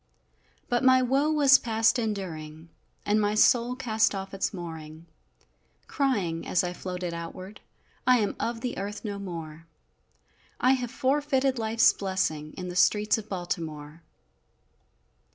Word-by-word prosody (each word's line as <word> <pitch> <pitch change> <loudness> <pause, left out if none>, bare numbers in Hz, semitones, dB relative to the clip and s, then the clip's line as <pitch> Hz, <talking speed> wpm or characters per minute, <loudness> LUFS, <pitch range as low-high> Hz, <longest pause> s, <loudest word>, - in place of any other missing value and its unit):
But 245 +1 0
my 260 0 +5
woe 270 +4 +2
was 280 -3 +6
past 225 +1 +2
enduring, 165 -7 -5 0.4
And 210 +1 +2
my 205 0 +1
soul 240 +2 +4
cast 220 -5 +1
off 195 0 -6
its 195 - -1
mooring, 160 -4 -8 0.8
Crying, 200 - -1
as 180 - +2
I 180 0 -3
floated 180 -1 -5
outward, 185 +4 -8 0.5
"I 255 0 +6
am 210 -3 -1
of 230 0 -3
the 250 - -3
earth 205 +3 -5
no 200 -1 -4
more! 165 -4 -8 0.9
I 255 - +4
have 250 -2 0
forfeited 270 0 0
life's 225 0 +4
blessing 160 -6 -2
In 180 - -5
the 180 - -6
streets 210 +4 +3
of 215 0 -11
Baltimore!" 165 -4 -5
205 Hz, 135 wpm, -27 LUFS, 175-245 Hz, 0.9 s, was